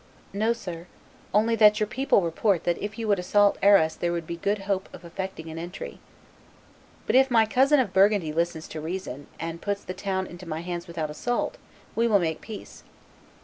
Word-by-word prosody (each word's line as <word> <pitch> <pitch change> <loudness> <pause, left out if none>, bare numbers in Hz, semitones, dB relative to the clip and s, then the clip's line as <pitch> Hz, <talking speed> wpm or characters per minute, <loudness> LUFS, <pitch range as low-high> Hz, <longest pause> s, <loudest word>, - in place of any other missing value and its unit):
"No, 215 +3 +1
sir; 180 -7 -6 0.4
only 220 +3 +3
that 210 0 +6
your 215 - +2
people 260 -2 +2
report 170 +2 +1
that 175 -1 0
if 210 +2 -5
you 225 -1 -3
would 200 -3 +3
assault 205 +3 +3
Arras 195 -6 +5
there 175 - -1
would 170 -1 -3
be 170 - -4
good 200 +4 -1
hope 195 -1 -1
of - - -11
effecting 170 -1 -6
an 160 0 -6
entry." 175 +2 -7 1.1
"But - - +1
if 265 +1 +6
my 225 -3 +5
cousin 270 +6 +4
of 230 -8 0
Burgundy 195 -5 +3
listens 170 0 -1
to 155 - -6
reason, 160 -5 -5
and 165 +1 -5
puts 200 -1 -2
the 185 - -5
town 190 -1 -2
into 175 0 -11
my 155 +1 -3
hands 175 0 -5
without 160 -3 -4
assault, 245 - -2 0.4
we 230 +1 +2
will 215 -3 +5
make 160 -4 -1
peace." 220 -2 -10
190 Hz, 195 wpm, -26 LUFS, 170-210 Hz, 1.1 s, that